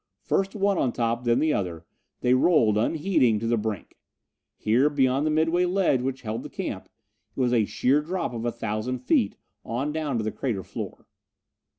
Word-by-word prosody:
First 195 +1 0
one 200 -2 +1
on 130 - +1
top, 120 +1 -1
then 120 0 +3
the 155 +3 +2
other, 85 -4 -3 0.4
they 125 - +3
rolled, 130 -6 +4
unheeding, 130 - +2
to 110 - -4
the 115 +1 +2
brink. 105 -3 -4 0.6
Here, 120 +7 +3
beyond 135 0 +2
the - - +2
midway 165 +3 +2
ledge 180 -8 +2
which 130 +1 -3
held 110 0 -3
the - - -8
camp, - - -5 0.5
it - - -7
was 125 -1 +2
a 115 -3 +3
sheer 135 +8 +2
drop 165 -4 -3
of 115 -1 -4
a 120 - 0
thousand 115 +2 -3
feet, 105 -5 +2 0.3
on 130 +6 -2
down 150 -5 -2
to 110 - -1
the 110 - -2
crater 110 -8 -3
floor. - - -7
125 Hz, 190 wpm, -26 LUFS, 115-150 Hz, 0.6 s, rolled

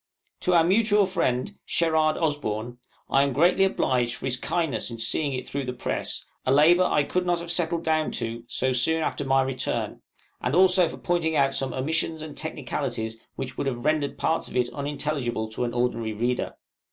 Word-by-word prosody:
To 180 - +1
our 165 - +6
mutual 205 +3 +3
friend, 170 -2 -1
SHERARD 160 -2 +2
OSBORN, 120 -7 -2 0.3
I 135 - +5
am 140 -1 +1
greatly 175 +7 +4
obliged 125 -10 +1
for - - -7
his 130 -1 +1
kindness 140 -3 -1
in 115 - -7
seeing 140 +5 0
it 130 - -4
through 140 -1 -3
the 125 - -3
press 125 - -3 0.2
a 130 - +1
labor 165 +6 +6
I 150 - +3
could 180 +5 -1
not 175 -1 +1
have 170 0 -4
settled 170 -1 +1
down 155 -1 +1
to 115 0 -3
so 130 +2 0
soon 160 +6 +3
after 145 - -2
my 135 0 +3
return; 130 -1 -3 0.4
and 125 +4 0
also 185 -1 +5
for - - -7
pointing 170 -2 0
out 135 -2 +3
some 135 -1 -2
omissions 155 +4 -1
and 155 -2 -8
technicalities 110 0 -3 0.2
which 130 -1 -6
would - - -1
have 125 -1 -3
rendered 155 -2 +1
parts 165 - 0
of - - -9
it 125 -1 +1
unintelligible 140 -6 -2
to 125 - -2
an 120 - -3
ordinary 115 -2 0
reader. 120 +3 -1
140 Hz, 190 wpm, -25 LUFS, 125-165 Hz, 0.4 s, our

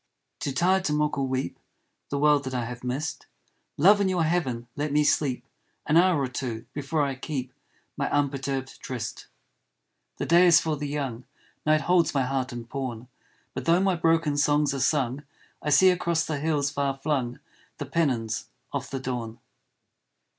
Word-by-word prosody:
Too 140 - -2
tired 185 +6 +2
to 150 - +1
mock 150 0 +1
or 135 - 0
weep 130 -8 -3 0.5
The 140 - -2
world 145 0 +4
that 130 0 -4
I 120 -2 -1
have 125 +1 -7
missed, 130 +4 -3 0.5
Love, 205 +7 +6
in 195 - +2
your 180 -3 +1
heaven 135 -8 -1
let 145 0 -2
me 150 +1 +3
sleep 140 -4 +1 0.4
An 155 - +1
hour 175 -2 +5
or 135 - 0
two, 125 -3 -5
before 145 +1 -1
I 140 -1 -1
keep 130 -1 -5 0.4
My 140 - -1
unperturbed 135 -2 -2
tryst. 120 -4 -5 0.9
The - - -2
day 175 +2 +6
is 170 -1 +7
for 160 -2 -1
the 145 0 -4
young, 135 -5 -4 0.4
Night 155 0 +4
holds 170 0 +2
my 135 - +3
heart 130 0 -2
in 120 -1 -6
pawn; 125 -1 -5 0.4
But - - -5
though 170 +2 +4
my 190 -1 +2
broken 165 -3 +2
songs 145 0 +2
are 135 - -3
sung 135 -1 +1 0.4
I 150 - -2
see 185 +6 +6
across 170 -2 0
the 150 -3 -2
hills 145 -2 0
far 140 -1 -1
flung 135 -4 -1 0.4
The - - -4
pennons 120 -9 -1 0.3
of - - -3
the 135 - -3
dawn. 120 -3 -4
145 Hz, 175 wpm, -26 LUFS, 130-155 Hz, 0.9 s, is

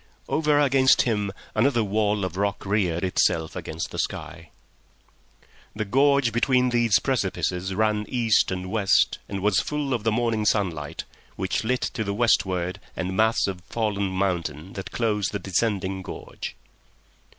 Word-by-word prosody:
Over 150 -2 +2
against 135 -2 +4
him 105 -4 -1 0.2
another 120 +1 +2
wall 105 -1 0
of 90 -1 -5
rock 100 +1 -1
reared 95 -4 0
itself 80 -3 +1
against 80 +1 -5
the - - -5
sky. 80 -1 -4 1.3
The 110 0 -2
gorge 135 +2 +3
between 125 +1 +3
these 120 -4 +3
precipices 95 -6 -1
ran 105 0 +1
east 115 -4 +2
and 90 0 -4
west 100 -3 +2
and 100 -1 -4
was 105 -3 +3
full 150 -2 -2
of 115 -4 -2
the 110 - +2
morning 115 -1 0
sunlight, 85 -9 -1 0.3
which 95 +3 -1
lit 125 +3 0
to 110 - -2
the 100 -1 -3
westward 95 -6 +1 0.2
the - - -2
mass 110 +5 +2
of 95 -2 -4
fallen 105 -3 -1
mountain 90 -3 -2
that 95 - -6
closed 105 -5 -1
the - - 0
descending 95 0 -1
gorge. - - -7
105 Hz, 150 wpm, -25 LUFS, 95-115 Hz, 1.3 s, against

